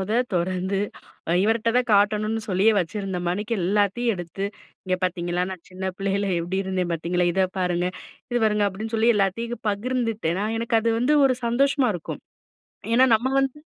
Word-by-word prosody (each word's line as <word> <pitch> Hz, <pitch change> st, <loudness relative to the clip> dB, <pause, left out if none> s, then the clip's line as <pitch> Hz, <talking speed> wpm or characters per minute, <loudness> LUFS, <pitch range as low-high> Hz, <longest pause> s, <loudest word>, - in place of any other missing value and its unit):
மொத 190 Hz, +2 st, -4 dB, 0.2 s
தொறந்து 185 Hz, +2 st, 0 dB, 0.6 s
இவர்கிட்ட 225 Hz, +2 st, +2 dB
தான் 250 Hz, -1 st, +2 dB
காட்டணும்னு 210 Hz, +2 st, +2 dB
சொல்லி 190 Hz, +1 st, +1 dB
வச்சிருந்தமாணிக்கு, 195 Hz, +2 st, -2 dB
எல்லாத்தையும் 205 Hz, +5 st, +1 dB
எடுத்து 175 Hz, +2 st, -5 dB, 0.4 s
இங்க 185 Hz, -1 st, 0 dB
பார்த்தீங்களா, 175 Hz, 0 st, -1 dB
நான் 185 Hz, -3 st, -8 dB
சின்ன 185 Hz, +1 st, -7 dB
பிள்ளயில 195 Hz, 0 st, -1 dB
எப்படி 175 Hz, +3 st, -2 dB
இருந்தே 185 Hz, -1 st, -1 dB
பார்த்தீங்களா, 175 Hz, +2 st, 0 dB
இத 190 Hz, +2 st, +2 dB
பாருங்க, 180 Hz, -1 st, 0 dB, 0.4 s
இது 240 Hz, -, +1 dB
பாருங்க 210 Hz, -1 st, +2 dB
அப்படின்னு 220 Hz, +4 st, -6 dB
சொல்லி 225 Hz, +2 st, +4 dB
எல்லாத்தையும் 230 Hz, +5 st, -1 dB
பகிர்ந்துட்டேனா, 215 Hz, -4 st, -1 dB
எனக்கு 230 Hz, 0 st, 0 dB
அது 230 Hz, -, +1 dB
வந்து 255 Hz, +6 st, +2 dB
ஒரு 255 Hz, -2 st, +1 dB
சந்தோஷமா 270 Hz, +2 st, +2 dB
இருக்கும். 165 Hz, -, -7 dB, 0.7 s
ஏன்னா 255 Hz, +2 st, +6 dB
நம்ம 235 Hz, +4 st, -1 dB
வந்து 270 Hz, +1 st, -1 dB
200 Hz, 150 wpm, -24 LUFS, 185-230 Hz, 0.7 s, ஏன்னா